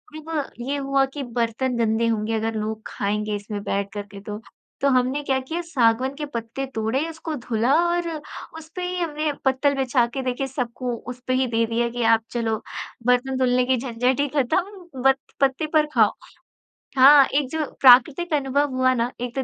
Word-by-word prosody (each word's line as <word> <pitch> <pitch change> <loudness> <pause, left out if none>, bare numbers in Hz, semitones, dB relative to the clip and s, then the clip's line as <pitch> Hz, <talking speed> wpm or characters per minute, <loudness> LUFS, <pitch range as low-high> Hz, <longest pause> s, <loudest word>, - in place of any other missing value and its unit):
तब 310 -2 -4
ये 270 +4 -2
हुआ 275 -1 +1
कि 285 -2 -4
बर्तन 240 +1 -1
गंदे 230 0 +1
होंगे 220 0 -1
अगर 225 +1 -2
लोग 220 0 -3
खाएँगे 210 +1 -2
इसमें 205 0 -5
बैठ 200 +1 -2
कर 205 - -3
के 200 - -9
तो। 210 +1 -7 0.4
तो 280 - +3
हमने 255 +2 +1
क्या 265 -1 +1
किया 320 +7 -4
सागवन 260 -5 +1
के 300 0 -4
पत्ते 235 0 -5
तोड़े, 220 +4 0
उसको 320 0 -6
धुला 240 +1 0
और 345 0 0 0.5
उस 320 0 -11
पे 365 - -4
ही 360 0 -3
हमने 305 -2 -1
पत्तल 265 +2 +2
बिछा 255 -2 +2
के 270 - -2
देखे 255 +2 -2
सबको 250 -1 -3 0.2
उसपे 250 +1 -4
ही 255 0 +2
दे 230 -1 +1
दिया 235 +1 0
कि 240 0 -3
आप 225 0 +4
चलो 230 -2 -1 0.5
बर्तन 255 +1 +2
धुलने 250 -1 +2
की 260 0 +2
झंझट 250 +2 0
ही 285 - +2
खत्म 345 +2 -2
ब 270 0 +6 0.3
पत्ते 275 +3 +2
पर 305 -1 +4
खाओ। - - +5 0.9
हाँ, 275 +1 +8
एक 280 -1 0
जो 315 0 -2 0.2
प्राकृतिक 275 +6 +6
अनुभव 285 0 +1
हुआ 255 0 +3
ना, 240 0 -1
एक 245 +1 -4
तो 265 - -1
255 Hz, 190 wpm, -23 LUFS, 230-285 Hz, 0.9 s, हाँ